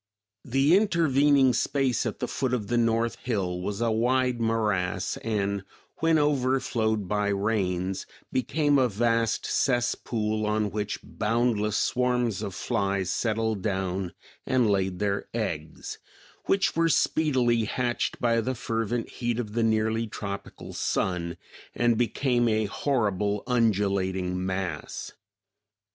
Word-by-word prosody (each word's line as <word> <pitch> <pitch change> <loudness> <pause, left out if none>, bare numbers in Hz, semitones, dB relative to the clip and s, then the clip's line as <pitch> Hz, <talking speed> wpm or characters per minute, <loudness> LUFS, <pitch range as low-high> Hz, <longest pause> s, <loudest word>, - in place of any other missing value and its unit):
The 135 +6 +3
intervening 145 - +4
space 135 -4 +1
at - - -4
the - - -3
foot 125 -1 -1
of 105 -5 -4
the 120 - +1
north 115 0 +1
hill 95 -7 -2
was 100 +3 -3
a 115 -1 +2
wide 125 +2 +1
morass, 105 -5 0
and 100 -3 -1 0.3
when 165 0 +3
overflowed 130 -7 +1
by 105 +1 0
rains 95 -2 -1 0.2
became 145 +2 +2
a 125 -2 +3
vast 115 +1 +1
cesspool 115 -4 0
on 105 -1 0
which 105 +1 -2
boundless 110 -1 0
swarms 125 -4 +1
of 100 -4 -4
flies 100 -4 -1
settled 110 -2 0
down 95 -2 -2 0.3
and 125 -3 +2
laid 95 -2 0
their 100 0 -1
eggs; 80 -9 -4 0.5
which 195 0 +2
were 165 0 +3
speedily 125 -9 +2
hatched 120 +2 -1
by 115 -1 +2
the 130 +3 -2
fervent 115 0 -2
heat 120 -2 -2
of 110 -4 -4
the 115 - 0
nearly 110 0 +1
tropical 100 -2 -7
sun, 85 -2 -1 0.4
and 120 -1 +3
became 120 +2 +1
a 110 0 +1
horrible 105 -4 0
undulating 95 -6 +1
mass. 95 -4 -4
115 Hz, 125 wpm, -27 LUFS, 100-125 Hz, 0.5 s, intervening